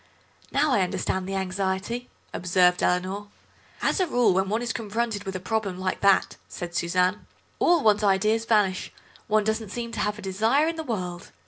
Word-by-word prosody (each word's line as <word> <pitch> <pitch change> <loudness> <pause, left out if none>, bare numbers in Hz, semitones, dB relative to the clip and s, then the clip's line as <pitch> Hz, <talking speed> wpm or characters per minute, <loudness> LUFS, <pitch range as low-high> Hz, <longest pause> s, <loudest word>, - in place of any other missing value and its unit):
"Now 290 +1 +2
I 210 - +3
understand 185 0 -2
the 195 - -2
anxiety," 190 +5 -2 0.2
observed 180 0 +3
Eleanor. 185 +3 0 0.6
"As - - +2
a 370 - +2
rule 245 - +3
when 190 +1 +1
one 220 +3 0
is 235 - -2
confronted 225 -1 -2
with 190 -1 -4
a - - -2
problem 195 0 -2
like 185 0 -2
that," 200 -1 +3
said 175 -1 -6
Suzanne, 180 +3 0 0.3
"all 340 -4 +4
one's 210 -1 +4
ideas 210 +3 +2
vanish; 205 -5 +1 0.4
one 215 0 +3
doesn't 220 0 -2
seem 235 +2 -5
to - - -5
have 210 +1 -1
a - - -9
desire 220 +10 +2
in 330 - -1
the 325 - -4
world. 180 - -4
205 Hz, 185 wpm, -25 LUFS, 185-225 Hz, 0.6 s, all